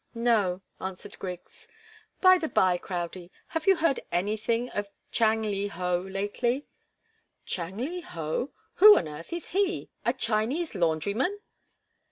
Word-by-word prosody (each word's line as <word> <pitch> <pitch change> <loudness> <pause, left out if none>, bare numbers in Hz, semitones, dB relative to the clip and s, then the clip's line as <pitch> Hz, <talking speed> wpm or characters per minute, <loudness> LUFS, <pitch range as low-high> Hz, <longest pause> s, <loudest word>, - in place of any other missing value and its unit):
"No," 210 -6 +2 0.2
answered 190 +2 -6
Griggs. 180 -2 -8 0.5
"By 370 -1 +7
the 320 - -1
bye, 180 -1 +3
Crowdie, 175 -1 -5 0.2
have 325 +1 -3
you 385 - +7
heard 320 -5 +2
anything 215 +6 0
of 205 -1 -3 0.2
Chang 220 -1 +3
Li 205 -1 -1
Ho 180 -2 -1
lately?" 205 +8 -1 0.8
"Chang 180 +2 -4
Li 330 +10 -3
Ho? 165 - -3 0.3
Who 420 +2 +10
on - - 0
earth 150 +2 -9
is 340 0 -5
he? 390 0 0
A 235 - +3
Chinese 245 +7 -1
laundryman?" 200 - 0
210 Hz, 135 wpm, -28 LUFS, 180-270 Hz, 0.8 s, Who